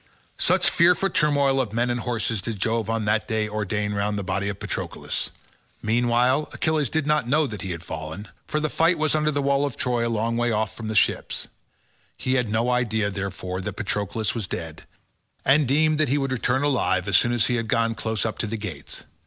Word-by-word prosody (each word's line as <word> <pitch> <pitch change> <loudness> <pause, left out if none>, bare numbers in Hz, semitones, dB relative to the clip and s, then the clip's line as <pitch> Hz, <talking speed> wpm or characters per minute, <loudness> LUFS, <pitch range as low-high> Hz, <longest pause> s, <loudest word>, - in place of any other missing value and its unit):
Such - - +4
fearful 180 +3 +4
turmoil 140 -3 +3
of 110 -5 -4
men 120 +2 +1
and 120 - -1
horses 115 -3 -1
did 110 +2 -4
Jove 115 +2 0
on 115 -1 -1
that 105 0 +1
day 110 -2 0
ordain 105 0 -2
round 105 +1 -1
the 100 - -2
body 100 +1 -1
of 100 -1 -5
Patroclus. - - -4 0.5
Meanwhile 120 +5 +2
Achilles 155 -3 +1
did 160 -3 0
not 150 -5 +1
know 155 +3 +3
that 105 -7 -6
he 95 - -4
had 85 -1 -5
fallen, 80 +5 -6 0.2
for 150 - 0
the 155 - 0
fight 165 +3 +2
was 155 -1 +1
under 155 0 +2
the 145 -2 0
wall 140 0 +2
of 140 -4 -2
Troy 120 -2 0
a - - -1
long 115 +1 0
way 120 0 +1
off 110 0 -1
the 110 -1 -4
ships. - - +1 0.7
He 130 - -1
had 125 -4 +1
no 115 +3 +1
idea, 110 -4 +1
therefore, 95 -1 -4
that - - -4
Patroclus 105 +1 -2
was 110 -5 -3
dead, 80 -3 -6 0.6
and 140 +1 +4
deemed 155 +3 +3
that 155 -4 +2
he 140 - +2
would 135 -2 -1
return 130 +2 0
alive 105 -9 +1
as 100 - +1
soon 120 - +5
as 120 -3 +2
he 120 - +1
had 115 -1 -2
gone 115 +1 +1
close 110 -1 -2
up 110 - -3
to 105 - -1
the 110 +2 -3
gates. 95 -9 -6
115 Hz, 215 wpm, -24 LUFS, 105-135 Hz, 0.7 s, soon